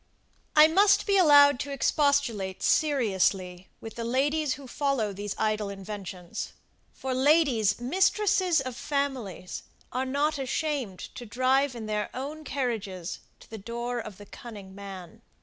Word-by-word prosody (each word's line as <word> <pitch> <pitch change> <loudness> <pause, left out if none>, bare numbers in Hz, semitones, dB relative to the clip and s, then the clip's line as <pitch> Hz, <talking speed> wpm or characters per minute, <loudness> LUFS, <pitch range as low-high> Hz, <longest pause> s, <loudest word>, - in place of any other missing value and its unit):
I 305 0 +9
must 390 +5 +4
be 400 - +2
allowed 285 -7 +7
to 285 - -4
expostulate 275 -9 +1
seriously 190 - +1
with 225 - -8
the 235 - -5
ladies, 280 +4 +1
who 280 - -12
follow 255 -7 -1
these 205 +1 -5
idle 215 -1 0
inventions; 195 -3 -7 0.4
for 265 -1 -4
ladies, 260 -7 +3
mistresses 375 - +2
of 255 -2 -5
families, 255 - -3 0.3
are 255 +1 -1
not 290 +2 0
ashamed 270 - -2 0.2
to 240 - -8
drive 255 +4 +2
in 225 -2 -6
their 210 -1 -2
own 290 +4 -5
carriages 210 - -3 0.2
to - - -17
the 220 - -6
door 235 +3 -4
of 215 -4 -8
the 205 - -12
cunning 205 -4 -11
man. 190 -3 -10
245 Hz, 140 wpm, -27 LUFS, 205-285 Hz, 0.4 s, I